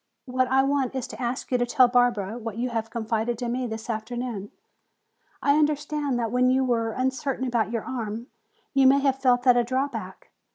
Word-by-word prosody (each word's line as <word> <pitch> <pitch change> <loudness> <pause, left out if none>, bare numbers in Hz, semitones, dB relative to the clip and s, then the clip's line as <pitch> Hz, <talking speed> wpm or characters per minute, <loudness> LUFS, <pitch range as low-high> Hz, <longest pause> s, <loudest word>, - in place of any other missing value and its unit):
What 255 0 0
I 265 +1 +3
want 275 -1 0
is 260 - -2
to 220 - -8
ask 245 +2 -3
you 250 - +2
to 245 - +2
tell 255 0 +5
Barbara 240 -4 +1
what 225 -2 -6
you 250 +2 -1
have 225 -1 -2
confided 225 +1 -2
to 245 0 -3
me 250 +1 -2
this 220 0 -6
afternoon. 225 -2 -4 0.9
I 285 +1 +4
understand 295 -2 0
that 230 -2 -1
when 250 +1 +3
you 260 +1 +3
were 230 -2 0
uncertain 260 +1 -1
about 235 -4 0
your 230 -2 -2
arm, 230 -2 -4 0.5
you 270 -2 +5
may 275 +1 +5
have 270 -1 +1
felt 245 -2 +3
that 250 -1 +5
a 240 - +4
drawback. 260 +4 -4
245 Hz, 200 wpm, -25 LUFS, 230-265 Hz, 0.9 s, tell